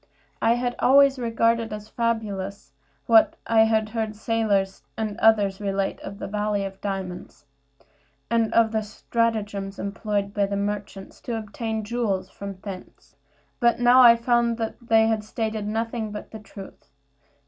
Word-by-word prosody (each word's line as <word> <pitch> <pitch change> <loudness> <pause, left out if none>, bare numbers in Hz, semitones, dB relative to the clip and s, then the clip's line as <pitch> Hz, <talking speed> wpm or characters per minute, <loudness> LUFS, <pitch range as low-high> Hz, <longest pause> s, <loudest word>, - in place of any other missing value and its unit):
I 230 +1 +4
had 245 0 -2
always 275 0 +5
regarded 230 -1 +1
as 210 0 -7
fabulous 205 - -3 0.3
what 225 -1 +5
I 220 -1 +5
had 220 -1 +1
heard 220 -1 -3
sailors 205 -3 0 0.2
and 215 -2 -2
others 205 -3 +3
relate 195 -1 -1
of 200 - -8
the - - -6
valley 210 0 -1
of 195 0 -8
diamonds, 190 -6 -6 0.8
and 230 -1 +1
of 230 -1 +3
the 220 -1 0
stratagems 210 -2 -2
employed 200 0 -3
by 200 -1 +1
merchants 200 -1 -4
to 235 -2 -3
obtain 220 +1 -4
jewels 210 -4 -2
from 200 -1 -7
thence; 195 -3 -10 0.4
but 235 0 +3
now 245 +1 +6
I 235 -2 +9
found 235 0 +1
that 225 -1 -3
they 225 -1 +4
had 220 -1 0
stated 220 -1 -3
nothing 225 0 -2
but 210 - -8
the 220 - -8
truth. 195 -7 -12
220 Hz, 150 wpm, -24 LUFS, 200-230 Hz, 0.8 s, I